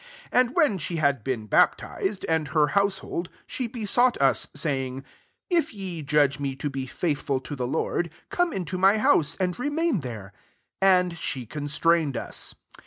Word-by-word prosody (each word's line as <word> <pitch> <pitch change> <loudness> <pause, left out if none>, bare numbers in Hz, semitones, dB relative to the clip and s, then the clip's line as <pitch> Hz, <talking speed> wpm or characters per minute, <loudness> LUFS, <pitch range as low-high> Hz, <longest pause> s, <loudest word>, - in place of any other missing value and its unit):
15 - - +4
And 250 - -12
when 300 - +3
she 170 +3 -3
had 140 -7 +1
been 125 -5 -2
baptized, 190 - +1
and 160 -2 +1
her 150 0 +2
household, 195 -3 0 0.2
she 255 - -3
besought 240 +2 +2
tt«, 135 -1 +3
saying, 135 -3 -2 0.2
« - - -43
If 335 -9 +1
ye 185 -5 -3
judge 145 -1 +2
me 140 -2 -2
to 145 +2 -3
be 135 -1 -4
faithful 145 -1 -1
to 145 - -6
the 125 -2 -2
Lord, 165 +4 -1 0.2
come 355 -1 +1
into 185 - -3
my 195 +3 +5
bouse, 155 -8 +3
and 180 -1 +1
i*emain 290 - 0
there." 110 -6 -7 0.5
And 180 -3 +3
she 130 -5 -3
constrained 150 +2 +1
us. - - -4
160 Hz, 170 wpm, -26 LUFS, 140-195 Hz, 0.5 s, my